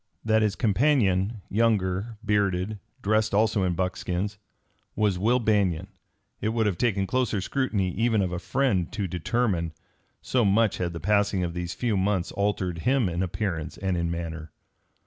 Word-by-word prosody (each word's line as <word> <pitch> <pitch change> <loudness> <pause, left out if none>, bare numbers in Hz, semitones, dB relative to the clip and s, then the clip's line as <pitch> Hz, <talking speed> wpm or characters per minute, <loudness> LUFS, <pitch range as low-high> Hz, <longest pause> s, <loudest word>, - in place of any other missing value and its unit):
That 110 0 +3
his 105 -3 +1
companion, 105 - +2
younger, 105 -1 0
bearded, 100 0 0 0.2
dressed 110 0 +2
also 110 -1 +3
in 90 -2 +1
buckskins, 90 +3 -2 0.6
was 100 -4 +1
Will 115 +6 +3
Banion 100 -6 +1 0.5
it 110 - 0
would 110 0 +1
have 95 -5 0
taken 105 -5 +1
closer 125 -2 0
scrutiny 100 -4 -1
even 110 +2 +1
of 90 - -2
a 90 - -3
friend 100 -6 0
to 100 -2 -2
determine, 90 -1 -1 0.5
so 125 -2 +1
much 105 +1 +3
had 85 -1 -2
the 85 - -5
passing 100 +1 +2
of 85 -1 -2
these 90 0 -4
few 120 -4 0
months 95 -2 0
altered 95 -4 -1
him 130 +3 +2
in 85 0 -2
appearance 90 -3 -3
and 95 -1 -1
in 85 -1 -1
manner. 80 -2 -5
100 Hz, 160 wpm, -26 LUFS, 90-110 Hz, 0.6 s, That